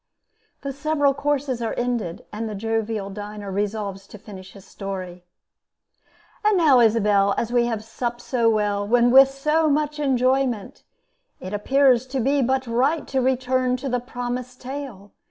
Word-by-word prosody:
[The 275 -1 -4
several 285 0 +1
courses 280 -3 -1
are 230 - -2
ended, 240 -8 -2
and 220 +1 -4
the 210 - -5
jovial 220 -1 -2
diner 205 0 -7
resolves 200 -1 -3
to - - -11
finish 190 -2 -12
his 195 -1 -14
story.] 185 -3 -7 1.2
And 420 -2 +3
now, 295 -7 +5
Isabel, 210 -3 +3
as 235 - -2
we 240 -1 +3
have 225 -3 -3
supped 240 +2 -4
So 240 -2 +1
well, 210 0 +1
and 240 0 +4
with 270 0 +8
so 300 +4 +1
much 300 +1 0
enjoyment, 255 -4 0 0.6
It 185 +2 -7
appears 260 +3 +3
to 265 +1 -3
be 275 +3 +2
but 260 +1 0
right 260 +7 0
To 265 -1 0
return 255 0 +1
to 270 +2 -5
the 250 0 0
promised 245 0 -5
tale. 250 -7 -8
245 Hz, 155 wpm, -23 LUFS, 210-270 Hz, 1.2 s, with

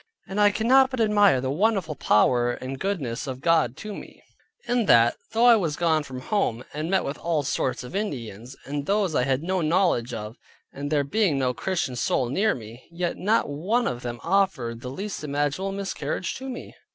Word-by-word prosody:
And 200 +2 -1
I 205 - +7
cannot 260 +5 +4
but 255 -2 -5
admire 205 -5 +4
at 130 - -2
the 130 - -1
wonderful 190 -1 +1
power 120 0 +3
and 130 +2 -6
goodness 150 -10 -3
of 130 -1 -5
God 155 -5 +2
to 215 -1 -7
me, - - -11 0.4
in 240 -3 +1
that, 115 0 +5 0.2
though 230 +2 +3
I 240 -1 +8
was 170 -9 0
gone 160 -2 +2
from 130 -3 -8
home, 125 - -1
and 155 +3 -3
met 190 0 +1
with 140 - -4
all 165 -3 0
sorts 130 -2 -1
of 125 +9 -9
Indians, 125 - -5
and 145 +1 -4
those 200 -4 +1
I 125 - +2
had 135 +2 0
no 185 +1 0
knowledge 165 -7 +1
of, 110 0 -6 0.4
and 145 +1 -5
there 145 -2 +2
being 175 0 +1
no 130 -2 +1
Christian 170 -5 -2
soul 120 0 0
near 205 - +1
me; 115 +1 -11
yet 170 0 -2
not 215 +5 +1
one 190 +12 0
of 120 -1 -2
them 120 -1 -5
offered 150 -11 0
the 125 - -6
least 195 +6 -5
imaginable 145 +6 -1
miscarriage 190 -3 -3
to 265 0 -7
me. 245 - -7
155 Hz, 200 wpm, -25 LUFS, 130-200 Hz, 0.4 s, I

